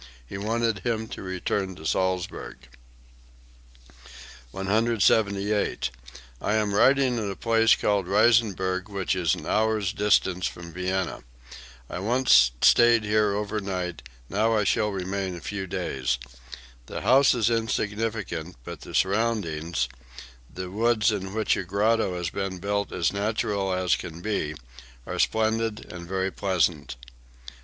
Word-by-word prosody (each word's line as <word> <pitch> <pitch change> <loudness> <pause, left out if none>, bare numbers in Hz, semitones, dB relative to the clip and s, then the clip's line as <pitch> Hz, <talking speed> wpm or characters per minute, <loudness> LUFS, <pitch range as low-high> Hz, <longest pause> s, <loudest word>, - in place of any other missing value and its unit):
He 65 - -9
wanted 115 0 0
him 110 +2 -2
to - - -7
return 95 +1 -2
to 80 - -12
Salzburg.) 95 +2 -2 1.9
178. 100 - +1 0.5
"I 105 - 0
am 105 -2 0
writing 130 +2 +4
at 105 -2 -2
a 100 - -4
place 115 +2 +4
called 100 -3 0
Reisenberg 100 -3 +2
which 100 -2 -1
is 90 -3 +1
an - - -9
hour's 110 -3 +1
distance 95 -3 +2
from 85 -1 -9
Vienna. 95 0 -2 0.7
I - - -5
once 110 - +5
stayed 120 -1 +6
here 105 -1 +2
over 105 +1 -2
night; 90 -6 -4 0.3
now 110 - +1
I 105 - +2
shall 105 +1 +1
remain 95 -1 -3
a - - -7
few 95 +4 -5
days. 65 -7 -2 0.7
The - - -5
house 135 +2 +5
is 120 -1 +2
insignificant, 105 -6 -2
but - - -8
the - - -8
surroundings, 95 - 0 0.6
the 90 0 -6
woods 110 +1 +2
in 95 -2 -4
which 110 -1 +2
a - - -3
grotto 100 +1 +1
has 90 -2 -3
been 95 -1 -3
built 100 +2 -2
as 90 +1 0
natural 100 -1 -1
as 90 -2 +2
can 85 0 -8
be, 80 -8 -2 0.5
are - - -5
splendid 110 -1 0
and 85 -1 -8
very 95 +1 -1
pleasant." 90 -5 0
100 Hz, 135 wpm, -26 LUFS, 95-110 Hz, 1.9 s, stayed